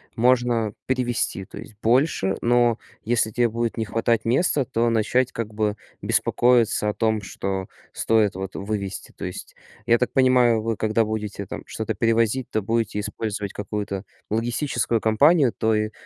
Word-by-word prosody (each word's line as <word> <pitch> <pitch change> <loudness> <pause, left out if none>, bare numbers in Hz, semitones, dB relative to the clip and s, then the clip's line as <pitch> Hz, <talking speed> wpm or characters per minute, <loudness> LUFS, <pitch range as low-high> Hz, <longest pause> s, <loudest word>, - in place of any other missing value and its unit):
можно 120 -3 +2
перевезти, 120 -6 -1
то - - -11
есть 105 - -11
больше, 120 -5 +2
но 120 -1 +3 0.2
если 115 -1 +2
те 120 +2 +2
будет 115 +1 -2
не 110 - -1
хватать 115 +1 0
места, 135 +2 +2
то 120 -2 0
начать 115 +3 +1
как 110 -2 -5
бы 105 -1 0 0.3
беспокоиться 120 -3 +2
о - - -1
том, 110 -2 +1
что 95 -1 -4 0.3
стоит, 110 -3 +2
вот, 95 0 -6
вывезти. 100 -1 -4
То - - -6
есть, - - -7 0.3
я 120 -1 +4
так 125 - 0
понимаю, 125 -4 +4
вы 115 0 -1
когда 110 +1 +1
будете, 105 -2 -4
там, - - -7
что-то - - -3
перевозить, 115 +2 +1
то 110 - -1
будете 110 -1 -1
использовать 105 -1 -4
какую-то 105 -1 -4 0.3
логистическую 120 +1 0
компанию, 135 +4 +4
то 110 0 +1
и 110 0 -1
115 Hz, 155 wpm, -23 LUFS, 105-120 Hz, 0.3 s, я